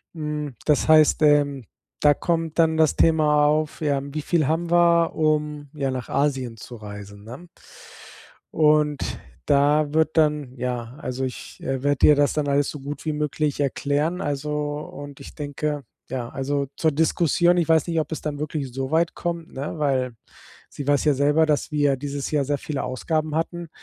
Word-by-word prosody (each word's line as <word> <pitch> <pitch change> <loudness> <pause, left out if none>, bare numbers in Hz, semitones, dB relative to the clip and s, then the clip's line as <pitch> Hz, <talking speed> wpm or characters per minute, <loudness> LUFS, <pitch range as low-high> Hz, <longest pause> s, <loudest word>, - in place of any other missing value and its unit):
Hm, 150 -4 -4
das 150 0 +2
heißt, 155 0 +5
ähm, 145 -3 +3 0.4
da 145 -1 +5
kommt 165 -1 -2
dann 160 -1 +3
das 160 -2 +3
Thema 150 -2 +4
auf, 155 +1 0
ja, 140 -2 +1
wie 140 +2 -5
viel 160 -5 +1
haben 165 +2 -1
wir, 170 -1 +4
um 150 -2 -1
ja 135 -2 -1
nach 130 -2 -5
Asien 135 -5 -1
zu 120 +3 -10
reisen, 100 -1 -10
ne? 130 +10 -10 1.1
Und 150 -2 +2 0.3
da 145 +1 +3
wird 160 0 +2
dann 150 -5 +1
ja, 125 0 -4
also 130 +1 -3
ich, 130 - -7
äh, 135 -1 -2
werde 145 -1 +3
ihr 150 - +7
das 145 0 +3
dann 150 -2 -1
alles 140 0 +2
so 145 - -8
gut 140 +1 -7
wie 155 - -1
möglich 150 0 -1
erklären, 145 +5 0
also, 145 -2 -3 0.3
und 145 -1 -9
ich - - -11
denke 145 0 -3 0.3
ja, 125 -2 -4
also 140 +1 -2
zur 160 - +2
Diskussion, 170 +3 +2
ich 170 -2 +1
weiß 160 -1 +4
nicht, 165 -1 0
ob 150 - -4
es - - -4
dann 150 -2 -4
wirklich 150 -3 -4
so 135 +1 -4
weit 165 +2 +1
kommt, 170 -1 -4
ne, 140 +4 -5
weil 130 -4 0 0.6
sie 145 - -7
weiß 145 +1 +3
ja 150 - +4
selber, 145 +4 +3
dass 150 -2 0
wir 145 -2 +2
dieses 140 +1 -4
Jahr 150 -2 +1
sehr 145 +1 0
viele 145 0 -4
Ausgaben 155 +4 -2
hatten. 165 +1 -3
150 Hz, 180 wpm, -23 LUFS, 140-155 Hz, 1.1 s, ihr